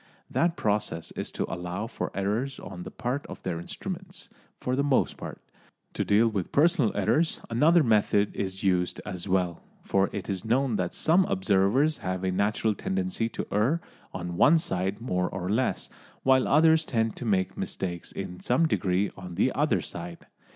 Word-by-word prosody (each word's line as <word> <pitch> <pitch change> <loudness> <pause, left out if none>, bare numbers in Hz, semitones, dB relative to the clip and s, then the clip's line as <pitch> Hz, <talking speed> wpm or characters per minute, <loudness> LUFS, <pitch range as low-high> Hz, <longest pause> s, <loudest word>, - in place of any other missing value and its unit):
That 170 0 +1
process 100 -6 -1
is - - -4
to - - -1
allow 90 +4 -4
for 115 - -4
errors 110 +8 -1
on 95 -3 -8
the - - -6
part 130 +3 -3
of - - -9
their 85 -3 -2
instruments, 85 - -7 0.3
for 125 - -1
the 140 - +1
most 140 -2 +2
part. - - -8 0.5
To - - -1
deal 105 +3 +4
with 100 -5 -2
personal 155 - +3
errors 155 - +2
another 155 +8 +5
method 105 -3 +2
is 95 0 -3
used 90 -2 +1
as 95 -1 -5
well, 90 -2 0 0.2
for 95 0 +2
it 100 -2 -5
is 95 -3 -3
known 125 +1 +1
that 90 -2 -2
some 175 +4 +4
observers 100 +10 +2
have 90 0 -3
a 95 - +1
natural 105 +3 +1
tendency 185 - -2
to - - -4
err 120 +11 +2 0.3
on 90 -1 -5
one 155 - +6
side 95 - -1
more 90 -6 0
or 90 0 -3
less, 125 +5 0 0.4
while 130 -1 +4
others 160 +1 +5
tend 115 -6 0
to 125 - -6
make 95 -4 +1
mistakes 85 -2 -4
in 90 0 -6
some 145 +7 +2
degree 95 -7 +1
on 90 -2 -8
the - - +2
other - - +1
side. 85 0 -7
105 Hz, 175 wpm, -27 LUFS, 95-130 Hz, 0.5 s, one